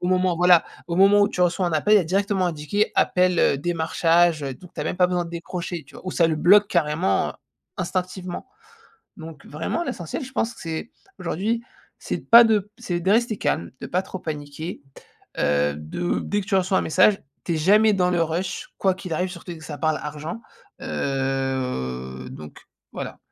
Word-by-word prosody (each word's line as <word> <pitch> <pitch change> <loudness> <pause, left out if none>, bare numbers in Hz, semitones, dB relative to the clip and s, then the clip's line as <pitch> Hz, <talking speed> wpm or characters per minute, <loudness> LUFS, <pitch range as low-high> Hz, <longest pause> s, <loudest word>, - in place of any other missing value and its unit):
au 180 - -1
moment, 185 -1 +2
voilà, 175 -1 +5 0.2
au 170 - -2
moment 200 +2 +6
où 200 - +3
tu 180 - -5
reçois 180 +1 +2
un 170 - -1
appel, 205 +7 +3
il - - +8
y - - +3
a 180 - -2
directement 195 +1 +1
indiqué 170 +6 -1
appel, 180 -1 +3
heu, 140 - +4
démarchage, 165 0 +2
heu, 135 -1 -3
donc 180 +5 -15
tu - - -5
as - - -2
même - - -2
pas 180 -1 +5
besoin 175 -1 0
de 170 - -9
décrocher, 170 0 -5
tu - - -19
vois? - - -13
Ou - - -1
ça 170 - +3
le 160 - +1
bloque 200 +6 +6
carrément, 165 0 +1
heu, - - -8 0.5
instinctivement. 185 - -3 0.7
Donc, 160 -3 -10
vraiment, 160 - -3
l'essentiel, 175 - -4
je 265 - -11
pense 235 -2 -1
que - - -15
c'est, 165 +6 -5 0.3
aujourd'hui, 210 +7 -1 0.4
c'est - - -3
de - - -14
pas 235 0 +10
de 210 -2 +1
c'est 175 -1 -2
de 190 +3 0
rester 225 0 +2
calme, 85 - -1
de - - -5
pas 185 +2 0
trop 190 - -7
paniquer, 155 +1 -6 0.6
heu, 70 0 +2
de, 75 - -3
dès 205 0 -1
que - - -9
tu 195 - +1
reçois 190 0 +2
un - - -1
message, 185 +5 +3 0.2
tu 170 - 0
es - - 0
jamais 210 +6 +5
dans 180 -2 +2
le 175 -1 +2
rush, 170 +3 -3
quoi 190 -1 +2
qu'il 185 -2 -8
arrive, 180 +4 -1
surtout, 180 - -9
dès - - -10
que 160 - -11
ça 145 -2 -6
parle 155 -1 +1
argent, 150 +6 -6 0.4
heu, 130 - -2
donc, 75 -1 -10 0.3
voilà. - - -6
175 Hz, 210 wpm, -23 LUFS, 155-190 Hz, 0.7 s, pas